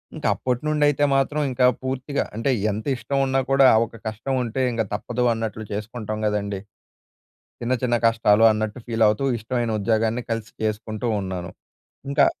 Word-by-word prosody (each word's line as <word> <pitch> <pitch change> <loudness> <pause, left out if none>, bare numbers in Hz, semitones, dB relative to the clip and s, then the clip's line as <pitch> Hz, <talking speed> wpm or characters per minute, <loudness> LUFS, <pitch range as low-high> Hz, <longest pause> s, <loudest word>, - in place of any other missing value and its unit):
ఇంకా - - -2
అప్పటి 125 -1 -2
నుండి 155 -1 +1
అయితే 145 0 +1
మాత్రం 140 +3 +1
ఇంకా 125 0 +4 0.2
పూర్తిగా 130 +2 -2
అంటే, 125 +4 +1 0.2
ఎంత 105 +2 -5
ఇష్టం 120 +4 -3
ఉన్నా 135 0 +1
కూడా 135 -1 +6 0.2
ఒక 115 -1 -14
కష్టం 110 +5 -3
ఉంటే, 120 +3 -2
ఇంక 115 -1 0
తప్పదు 120 +4 -1
అన్నట్లు 110 -1 -4
చేసుకుంటాం 110 +1 -4
కదండీ! 100 -2 -2 1.0
చిన్న, 120 +2 0
చిన్న 120 -1 +2
కష్టాలు 115 -1 +4
అన్నట్టు 110 +2 -3
ఫీల్ 115 -2 +2
అవుతూ, 105 +6 0
ఇష్టమైన 120 +1 -2
ఉద్యోగాన్ని 115 +3 +1
కలిసి 115 -1 -3
చేసుకుంటూ 110 +1 -3
ఉన్నాను. 95 -2 -5 0.6
ఇంకా 140 0 +4
115 Hz, 155 wpm, -23 LUFS, 110-130 Hz, 1.0 s, కూడా